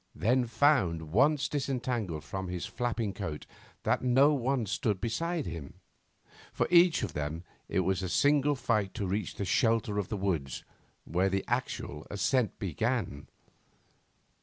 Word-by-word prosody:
then 125 Hz, +2 st, +2 dB
found, 95 Hz, -, +2 dB
once 140 Hz, -, +3 dB
disentangled 125 Hz, -, -2 dB
from 95 Hz, -1 st, -5 dB
his 90 Hz, -1 st, -4 dB
flapping 115 Hz, -4 st, -2 dB
cloak, 95 Hz, -6 st, -5 dB, 0.4 s
that -, -, +1 dB
no 130 Hz, +4 st, +5 dB
one 130 Hz, -2 st, 0 dB
stood 100 Hz, 0 st, -1 dB
beside 165 Hz, -, -2 dB
him. 80 Hz, -5 st, -7 dB, 0.8 s
For -, -, 0 dB
each 175 Hz, -1 st, +6 dB
of -, -, -3 dB
them 75 Hz, +3 st, -3 dB, 0.3 s
it -, -, +1 dB
was 95 Hz, 0 st, 0 dB
a 95 Hz, -, -3 dB
single 145 Hz, +5 st, +3 dB
fight 110 Hz, -7 st, 0 dB
to 105 Hz, -, -2 dB
reach 100 Hz, +3 st, -2 dB
the 100 Hz, -, -3 dB
shelter 115 Hz, -1 st, +2 dB
of 100 Hz, -, -2 dB
the 105 Hz, -, -2 dB
woods, 85 Hz, -10 st, -2 dB, 0.4 s
where 90 Hz, +3 st, +1 dB
the 95 Hz, 0 st, -1 dB
actual 120 Hz, -, -3 dB
ascent 115 Hz, +3 st, 0 dB
began. 100 Hz, -, -2 dB
110 Hz, 145 wpm, -30 LUFS, 90-130 Hz, 0.8 s, each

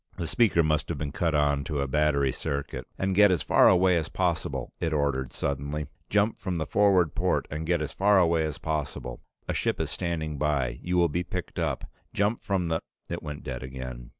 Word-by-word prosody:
The 85 Hz, -, -3 dB
speaker 95 Hz, -3 st, +3 dB
must 75 Hz, -1 st, 0 dB
have -, -, -2 dB
been 75 Hz, -2 st, -3 dB
cut 80 Hz, +1 st, 0 dB
on 70 Hz, -1 st, +2 dB
to 75 Hz, -3 st, -2 dB
a 70 Hz, -, 0 dB
battery 70 Hz, -1 st, +2 dB
circuit. 70 Hz, -2 st, -4 dB
"And 95 Hz, 0 st, 0 dB
get 105 Hz, +2 st, +6 dB
as 90 Hz, -4 st, +1 dB
far -, -, +6 dB
away 90 Hz, -1 st, +4 dB
as 80 Hz, 0 st, -2 dB
possible," 85 Hz, -3 st, -2 dB
it 80 Hz, -1 st, -1 dB
ordered 70 Hz, -3 st, 0 dB
suddenly. 70 Hz, +2 st, -3 dB, 0.2 s
"Jump 105 Hz, +2 st, +2 dB
from 95 Hz, -2 st, -3 dB
the 80 Hz, -2 st, -1 dB
forward 95 Hz, 0 st, +3 dB
port -, -, 0 dB
and 80 Hz, +2 st, -4 dB
get 85 Hz, -2 st, +1 dB
as 75 Hz, -, -5 dB
far 100 Hz, +1 st, +4 dB
away 85 Hz, -3 st, +3 dB
as 75 Hz, -2 st, -3 dB
possible. 75 Hz, -6 st, -4 dB, 0.3 s
A -, -, -1 dB
ship -, -, 0 dB
is -, -, -2 dB
standing 80 Hz, -4 st, -3 dB
by. 70 Hz, -4 st, 0 dB
You 90 Hz, 0 st, -1 dB
will 85 Hz, -1 st, +5 dB
be 85 Hz, +3 st, -1 dB
picked 90 Hz, 0 st, -5 dB
up. -, -, -1 dB, 0.3 s
Jump 105 Hz, +3 st, +1 dB
from 95 Hz, -3 st, 0 dB
the 80 Hz, -1 st, 0 dB, 0.2 s
". -, -, -42 dB
It 85 Hz, -, -3 dB
went 75 Hz, -2 st, -7 dB
dead 65 Hz, -2 st, -5 dB
again. 65 Hz, -2 st, -7 dB
80 Hz, 215 wpm, -27 LUFS, 70-90 Hz, 0.3 s, get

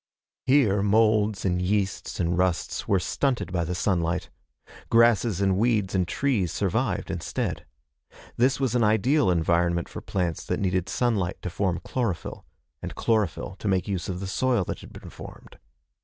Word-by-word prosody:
Here 125 Hz, -8 st, +4 dB
moulds 105 Hz, 0 st, +2 dB
and 90 Hz, -1 st, +1 dB
yeasts 95 Hz, +1 st, -1 dB
and 85 Hz, 0 st, +1 dB
rusts 90 Hz, -1 st, -1 dB
were 100 Hz, -, +3 dB
stunted 125 Hz, -, -1 dB
by 85 Hz, -2 st, +1 dB
the 90 Hz, +2 st, -3 dB
sunlight. 85 Hz, -1 st, -1 dB, 0.6 s
Grasses 115 Hz, -4 st, +4 dB
and 95 Hz, -1 st, +2 dB
weeds 105 Hz, -4 st, +1 dB
and 90 Hz, -2 st, +1 dB
trees 110 Hz, -4 st, 0 dB
survived, 105 Hz, 0 st, -1 dB
instead. 90 Hz, -3 st, -3 dB, 0.7 s
This 130 Hz, +3 st, +2 dB
was 130 Hz, -4 st, 0 dB
an 120 Hz, -2 st, +2 dB
ideal 110 Hz, +5 st, +3 dB
environment 85 Hz, 0 st, +1 dB
for -, -, -8 dB
plants 90 Hz, -4 st, -2 dB
that -, -, -1 dB
needed 95 Hz, -2 st, 0 dB
sunlight 105 Hz, -7 st, 0 dB
to 90 Hz, -, -3 dB
form 90 Hz, 0 st, -1 dB
chlorophyll, 115 Hz, -10 st, -3 dB, 0.3 s
and -, -, -6 dB
chlorophyll 105 Hz, -3 st, 0 dB
to -, -, -4 dB
make 95 Hz, -1 st, +1 dB
use 95 Hz, -3 st, -3 dB
of 90 Hz, -1 st, -3 dB
the -, -, -3 dB
soil 120 Hz, +2 st, +1 dB
that -, -, -5 dB
had -, -, -12 dB
been -, -, -11 dB
formed. -, -, -12 dB
95 Hz, 160 wpm, -26 LUFS, 90-115 Hz, 0.7 s, Here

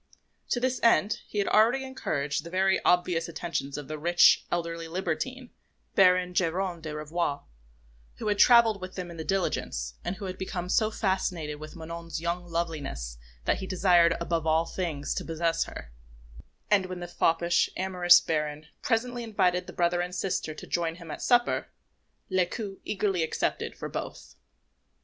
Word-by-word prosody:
To 245 Hz, -, +1 dB
this 255 Hz, +1 st, 0 dB
end 215 Hz, -3 st, +3 dB
he -, -, -7 dB
had 200 Hz, -, +1 dB
already 235 Hz, +5 st, +4 dB
encouraged 145 Hz, -, -2 dB
the 170 Hz, -, -8 dB
very 190 Hz, +1 st, +2 dB
obvious 175 Hz, -1 st, +2 dB
attentions 155 Hz, -5 st, -4 dB
of 145 Hz, -2 st, -7 dB
the 155 Hz, 0 st, -5 dB
rich, 175 Hz, +3 st, +5 dB
elderly 170 Hz, -1 st, -2 dB
libertine, 245 Hz, +9 st, -3 dB, 0.4 s
Baron 180 Hz, -1 st, +4 dB
Geronte 180 Hz, 0 st, 0 dB
de 155 Hz, -2 st, -6 dB
Ravoir, 150 Hz, -1 st, -2 dB, 0.7 s
who 220 Hz, -, -5 dB
had 205 Hz, -1 st, +1 dB
travelled 230 Hz, -5 st, +6 dB
with 185 Hz, 0 st, -7 dB
them 180 Hz, -2 st, -5 dB
in 170 Hz, -, -10 dB
the 160 Hz, -, -4 dB
diligence, 110 Hz, -, -1 dB
and 190 Hz, -, -3 dB
who 200 Hz, -, -7 dB
had 185 Hz, 0 st, -6 dB
become 180 Hz, -1 st, -4 dB
so 215 Hz, +3 st, +3 dB
fascinated 180 Hz, -8 st, -2 dB
with 155 Hz, +2 st, -9 dB
Manon's 165 Hz, 0 st, -6 dB
young 170 Hz, +1 st, -3 dB
loveliness 150 Hz, -, -4 dB, 0.3 s
that -, -, +2 dB
he 190 Hz, -, -5 dB
desired 175 Hz, -3 st, +4 dB
above 170 Hz, -1 st, -1 dB
all 160 Hz, +1 st, +3 dB
things 165 Hz, -5 st, -3 dB
to -, -, -3 dB
possess 165 Hz, 0 st, 0 dB
her; 60 Hz, -, -9 dB, 0.8 s
and 195 Hz, -3 st, +4 dB
when 185 Hz, -1 st, -6 dB
the 175 Hz, -, -6 dB
foppish, 170 Hz, 0 st, +2 dB
amorous 180 Hz, -2 st, +6 dB
Baron 150 Hz, -1 st, -2 dB, 0.2 s
presently 245 Hz, +1 st, 0 dB
invited 180 Hz, -5 st, +1 dB
the -, -, -7 dB
brother 175 Hz, 0 st, +1 dB
and 180 Hz, +1 st, -4 dB
sister 180 Hz, -4 st, -2 dB
to -, -, -9 dB
join 165 Hz, -1 st, -1 dB
him 170 Hz, -2 st, -10 dB
at -, -, -6 dB
supper, 240 Hz, -1 st, +2 dB, 0.6 s
Lescaut 190 Hz, +2 st, -1 dB
eagerly 195 Hz, -3 st, 0 dB
accepted 160 Hz, -, -2 dB
for -, -, -5 dB
both. -, -, -7 dB
175 Hz, 165 wpm, -28 LUFS, 165-190 Hz, 0.8 s, travelled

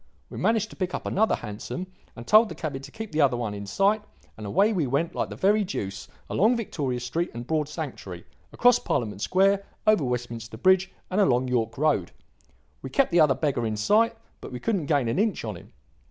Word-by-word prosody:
We -, -, -6 dB
managed 220 Hz, -1 st, +1 dB
to -, -, -11 dB
pick 185 Hz, -1 st, -2 dB
up -, -, -6 dB
another 220 Hz, +3 st, +2 dB
hansom 115 Hz, -, -6 dB, 0.3 s
and 115 Hz, -, -9 dB
told 215 Hz, -, +6 dB
the -, -, -7 dB
cabby 150 Hz, -4 st, -4 dB
to 135 Hz, -, -11 dB
keep 220 Hz, -1 st, -7 dB
the 155 Hz, 0 st, +1 dB
other 135 Hz, -4 st, +3 dB
one 115 Hz, -4 st, -3 dB
in 100 Hz, 0 st, -7 dB
sight, 200 Hz, -, +2 dB, 0.3 s
and 105 Hz, -1 st, -7 dB
away 200 Hz, -, +3 dB
we 165 Hz, -8 st, 0 dB
went 140 Hz, +6 st, 0 dB
like -, -, -2 dB
the -, -, -7 dB
very 210 Hz, +2 st, +3 dB
deuce; 95 Hz, -, -5 dB, 0.2 s
along 225 Hz, +5 st, +3 dB
Victoria 145 Hz, -, -3 dB
Street 145 Hz, +9 st, -2 dB
and 120 Hz, +1 st, -6 dB
Broad 150 Hz, +1 st, -1 dB
Sanctuary, 130 Hz, -, -7 dB, 0.3 s
across 245 Hz, 0 st, +4 dB
Parliament 105 Hz, -4 st, -2 dB
Square, 195 Hz, -, +3 dB, 0.2 s
over 215 Hz, -7 st, +4 dB
Westminster 120 Hz, -3 st, -4 dB
Bridge 185 Hz, +6 st, +3 dB, 0.2 s
and 200 Hz, +3 st, +2 dB
along 130 Hz, -7 st, +2 dB
York 115 Hz, -3 st, -1 dB
Road; 155 Hz, +2 st, +1 dB, 0.7 s
we -, -, -6 dB
kept 275 Hz, -6 st, +2 dB
the 175 Hz, -, +4 dB
other 150 Hz, -4 st, +5 dB
beggar 135 Hz, -3 st, -1 dB
in 110 Hz, -1 st, -2 dB
sight, 225 Hz, -, +3 dB, 0.3 s
but -, -, -8 dB
we 125 Hz, -, -5 dB
couldn't 195 Hz, -, -1 dB
gain 145 Hz, -5 st, +2 dB
an 115 Hz, +8 st, 0 dB
inch 210 Hz, -, 0 dB
on 105 Hz, -3 st, -4 dB
him. 85 Hz, -, -14 dB
150 Hz, 210 wpm, -26 LUFS, 120-200 Hz, 0.7 s, told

